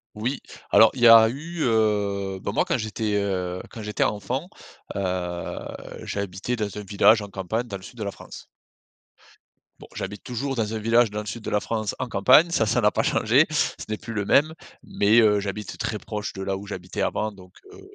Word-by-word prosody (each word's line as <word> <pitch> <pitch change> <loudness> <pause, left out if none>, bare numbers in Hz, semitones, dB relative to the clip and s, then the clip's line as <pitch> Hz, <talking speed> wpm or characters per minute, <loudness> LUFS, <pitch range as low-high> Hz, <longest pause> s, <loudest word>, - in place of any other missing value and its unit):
Oui, 120 +6 -2 0.3
alors 110 - +7
il 130 - -7
y 120 - +8
a 115 -1 +9
eu, 155 +8 -6
heu, 100 -4 0
bah, 100 - -3
moi - - +2
quand - - 0
j'étais, 110 -2 -2
heu, 90 -2 -2
quand 115 - -9
j'étais 105 0 -1
enfant, 125 - -2 0.5
heu, 90 -2 -3 0.5
j'habitais 100 +4 -3
dans 105 -3 -4
un 105 - -5
village 105 +2 +4
en 105 - -6
campagne 100 +5 -3
dans 100 - -6
le 95 - -9
sud 120 - -12
de - - -2
la 100 - -3
France. - - -12 1.3
Bon, - - -12
j'habite 105 - -6
toujours 135 +2 -3
dans 110 -2 -1
un 110 - -2
village 115 +1 +3
dans 105 - -3
le 105 - -6
sud 115 +2 -6
de - - -4
la 105 - +1
France 110 -1 -3
en 130 - -2
campagne. 125 - +5
Ça, 115 - +1
ça 105 - +1
n'a - - +3
pas - - 0
changé - - +3
ce - - -1
n'est 110 - -2
plus 115 - -8
le 105 - -1
même, 150 +8 +3 0.3
mais 105 +3 +3
heu, 105 -2 +4
j'habite 100 0 -5
très - - -2
proche 105 -1 -5
de 95 - -7
là 95 0 -1
où 100 - -7
j'habitais 90 -3 -6
avant 110 0 -1
donc 95 -2 -16 0.2
heu, 400 - -13
105 Hz, 215 wpm, -24 LUFS, 100-115 Hz, 1.3 s, a